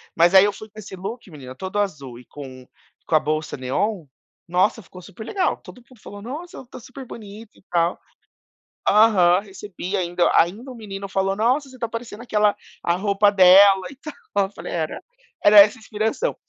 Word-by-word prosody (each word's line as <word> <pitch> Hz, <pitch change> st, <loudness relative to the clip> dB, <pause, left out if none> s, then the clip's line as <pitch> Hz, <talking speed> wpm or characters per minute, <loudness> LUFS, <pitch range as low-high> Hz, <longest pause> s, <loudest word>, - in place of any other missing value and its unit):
Mas 170 Hz, +3 st, +4 dB
aí 190 Hz, +1 st, +8 dB
eu 205 Hz, -, -1 dB
fui 215 Hz, +2 st, -11 dB
com 215 Hz, -, -13 dB
esse 195 Hz, -2 st, -9 dB
look 200 Hz, +4 st, -8 dB
menina, 130 Hz, -5 st, -11 dB
todo 190 Hz, +5 st, -4 dB
azul 140 Hz, -12 st, -4 dB
e 125 Hz, -, -16 dB
com 130 Hz, -3 st, -11 dB, 0.4 s
com 160 Hz, -, 0 dB
a -, -, +6 dB
bolsa 155 Hz, +1 st, -3 dB
neon, 160 Hz, -, -2 dB, 0.4 s
nossa, 185 Hz, +6 st, +1 dB
ficou 180 Hz, 0 st, -14 dB
super 220 Hz, +5 st, -11 dB
legal, 380 Hz, -, -1 dB
todo -, -, -14 dB
mundo 250 Hz, -4 st, -19 dB
falou: 205 Hz, 0 st, -11 dB
"Nossa, 285 Hz, +4 st, -8 dB
tá -, -, -11 dB
super 255 Hz, +2 st, -11 dB
bonito 215 Hz, -1 st, -11 dB
e -, -, -23 dB
tal". 170 Hz, 0 st, 0 dB, 0.9 s
Aham, 195 Hz, -5 st, +5 dB
recebi 195 Hz, -1 st, -7 dB
ainda 175 Hz, -1 st, 0 dB
ainda 215 Hz, +10 st, +1 dB
o -, -, -10 dB
menino 200 Hz, -3 st, -7 dB
falou: 195 Hz, 0 st, -1 dB
"Nossa, 255 Hz, +7 st, 0 dB
você 260 Hz, -, -14 dB
tá 230 Hz, -, -3 dB
parecendo 230 Hz, 0 st, -8 dB
aquela 210 Hz, -3 st, +1 dB, 0.3 s
a 170 Hz, -, +1 dB
roupa 200 Hz, +1 st, +2 dB
dela 190 Hz, 0 st, +6 dB
e 280 Hz, -, -13 dB
tal", 305 Hz, +2 st, -9 dB, 0.3 s
eu 195 Hz, -, -20 dB
falei: -, -, -8 dB
"Era, 160 Hz, -, -3 dB, 0.4 s
era 205 Hz, 0 st, +8 dB
essa 205 Hz, +4 st, +6 dB
inspiração". 220 Hz, -, -3 dB
200 Hz, 190 wpm, -22 LUFS, 175-220 Hz, 0.9 s, aí